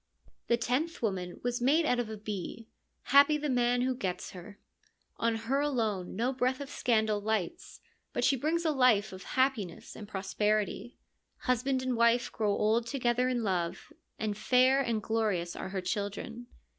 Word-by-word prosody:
The 235 - +3
tenth 260 +7 -1
woman 185 -4 -2
was 245 0 -1
made 300 +6 +3
out 250 -4 +2
of 235 -3 -2
a 220 - -6
bee: 210 +2 -6 0.5
happy 285 +2 +7
the 295 -1 -2
man 245 0 +2
who 255 +1 +1
gets 185 -7 -4
her! 195 +3 -11 0.6
On 230 0 +1
her 230 +5 -1
alone 220 -11 -1
no 240 +6 0
breath 255 0 0
of 280 -1 -7
scandal 220 -3 +1
lights, 220 - -3 0.3
but - - -2
she 275 - +4
brings 320 +6 -1
a 315 - +3
life 230 -7 +3
of 185 - -9 0.2
happiness 255 -10 0
and 210 - -9
prosperity. 210 +3 -1 0.4
Husband 255 +1 0
and 255 -1 0
wife 235 +1 +3
grow 215 -2 -1
old 220 +3 +1
together 250 -1 +1
in 245 -2 -1
love, 180 -4 -2 0.2
and 215 -1 -2
fair 255 +5 +4
and 230 -5 -1
glorious 210 -6 -1
are - - -5
her 190 -1 -3
children. 205 +5 -4
230 Hz, 170 wpm, -30 LUFS, 210-255 Hz, 0.6 s, happy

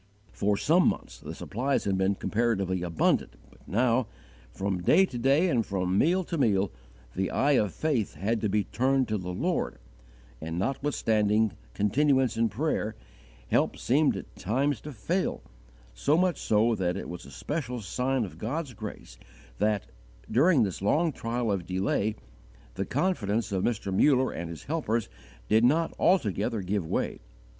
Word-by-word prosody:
For 100 0 0
some 170 - +4
months - - -2
the - - -8
supplies 130 +5 -1
had 100 -1 0
been 95 +1 +1
comparatively 100 -5 0
abundant, 85 -2 +1 0.2
but - - -22
now, 120 +2 +2 0.4
from 95 +7 -2
day 190 - +5
to 130 - -7
day 140 +8 +3
and 125 -9 +2
from 95 -2 -1
meal 175 - +3
to 170 -2 -4
meal, 100 -6 +2 0.4
the 95 +1 0
eye 145 - +2
of 105 -8 +3
faith 135 - -1
had 105 +7 -1
to 110 - 0
be 105 +1 +1
turned 130 +4 +1
to 105 -1 0
the 90 0 -5
Lord, 90 - -1 0.6
and, 80 +1 -4
notwithstanding 110 -3 +1 0.2
continuance 130 +5 +2
in 115 0 +2
prayer, 110 -2 -1 0.5
help - - +2
seemed 145 +4 +2
at - - -10
times 130 +4 0
to 150 - -7
fail, 170 - -2 0.5
so 145 - +2
much 180 -3 +1
so 110 +2 +2
that 90 -3 -1
it - - -5
was 90 0 -8
a - - -11
special 125 - -4
sign 125 +5 -1
of 95 - -11
God's 135 +4 -3
grace 100 - -9 0.4
that, 105 -2 +1 0.5
during 140 +1 +5
this 95 -3 -3
long 155 - +2
trial 115 -3 -2
of 95 -4 -2
delay, 100 +3 0 0.6
the - - -3
confidence 115 - 0
of 95 -2 0
Mr. 100 -5 -1
Muller 130 +3 +4
and 85 0 -5
his 85 -2 -8
helpers 120 - -1 0.4
did 110 +2 +4
not 160 +7 +3
altogether 110 - +1
give 95 -2 -1
way. - - -2
110 Hz, 160 wpm, -28 LUFS, 100-135 Hz, 0.6 s, day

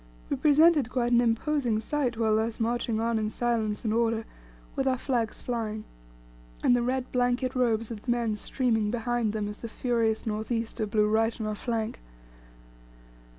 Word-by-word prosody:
We - - +2
presented 300 -3 +5
quite 245 -1 0
an 240 0 +5
imposing 240 0 +1
sight 250 0 -1
while 220 -1 +2
thus 220 +1 -1
marching 230 -1 0
on 230 0 +1
in 215 -1 -1
silence 225 -2 -1
and 215 - +1
order, 225 -1 +1 0.5
with 270 - 0
our 260 -1 +2
flags 240 -4 -2
flying, 220 -3 -3 0.8
and 245 - +5
the 245 - +1
red 255 +1 -1
blanket 250 +1 +1
robes 230 -3 +1
of 215 -3 -6
the 250 - -8
men 235 -3 +1
streaming 225 -1 0
behind 240 -1 0
them 210 -1 -2
as 210 0 -7
the 230 - -6
furious 230 -2 0
north 220 +1 -3
easter 225 -1 -2
blew 210 0 +2
right 225 +2 +1
on 220 - -2
our 215 - -1
flank. 225 0 -3
230 Hz, 175 wpm, -28 LUFS, 220-245 Hz, 0.8 s, presented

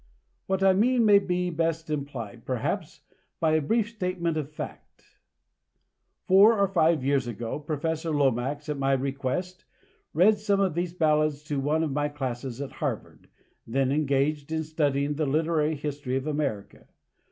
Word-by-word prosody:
What 190 0 0
I 190 -1 +6
mean 235 +4 +3
may 205 -1 +7 0.3
best 165 0 -1
be 155 - -2
implied, 120 -6 -6
perhaps, 125 -3 -3 0.4
by 160 -1 +2
a 155 0 +3
brief 220 +8 +1
statement 180 -6 -2
of 150 -3 -3
fact. 155 - -10 1.1
Four 205 +4 +6
or 200 0 +3
five 165 -6 +2
years 135 -2 +1
ago, 115 +3 -4
Professor 155 +2 -3
Lomax, 145 0 0
at 150 -2 -3
my 135 0 +2
request, 140 +7 -2 0.5
read 205 +6 +5
some 205 -1 +1
of 190 -4 +2
these 175 +1 -3
ballads 155 -3 +2
to 145 -2 -2
one 150 +4 +1
of 155 - -1
my 145 +1 0
classes 130 -3 -5
at 140 - -5
Harvard, - - -5 0.4
then 130 +3 +1
engaged 145 +1 0
in 160 0 -1
studying 145 -2 0
the 155 -2 0
literary 155 +1 +1
history 140 -3 -4
of 135 +1 -2
America. 145 -10 -3
150 Hz, 155 wpm, -27 LUFS, 140-170 Hz, 1.1 s, may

